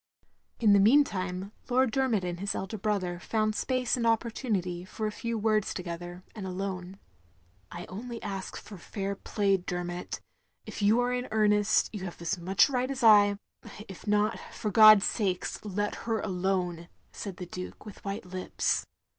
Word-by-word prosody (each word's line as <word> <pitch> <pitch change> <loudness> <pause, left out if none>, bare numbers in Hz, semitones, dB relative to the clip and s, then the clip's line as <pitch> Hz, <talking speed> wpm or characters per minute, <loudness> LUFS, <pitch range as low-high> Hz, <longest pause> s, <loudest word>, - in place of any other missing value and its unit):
In 215 -3 +5
the 200 - +6
meantime 195 -5 +2 0.2
Lord 255 -1 +3
Dermot 245 -6 +1
and 175 -1 -4
his 200 +1 -2
elder 195 +3 -4
brother 190 -4 -1
found 215 +2 0
space 255 +1 0
and 235 -2 0
opportunity 215 -6 -1
for 215 +4 -5
a 215 - -1
few 230 +2 -3
words 215 -1 +1
together, 175 0 -6
and 200 -4 -6
alone. 185 0 -4 0.7
"I 175 0 -7
only 230 +4 -7
ask 195 -2 -5
for 200 -3 -10
fair 195 +2 -4
play, 200 0 +1
Dermot. 175 -1 -4 0.5
If - - -7
you 210 +4 +4
are 245 0 0
in 250 0 -2
earnest, 210 -1 +3
you 205 -3 -5
have 175 - -7
as 170 +1 -2
much 185 +3 +4
right 255 -2 -1
as 265 -2 -4
I 205 -2 +7 0.3
— 210 - -11
if 190 +2 -11
not, 210 +2 +2
for 210 - -3
God's 215 -2 +8
sake, 190 -5 0 0.2
let 205 0 -2 0.2
her 225 -1 +1
alone," 180 -3 -1 0.2
said 195 -3 -7
the 180 - -6
Duke, 180 +3 -8
with 210 - -11
white 200 +1 -4
lips. 185 0 -1
200 Hz, 170 wpm, -29 LUFS, 185-220 Hz, 0.7 s, God's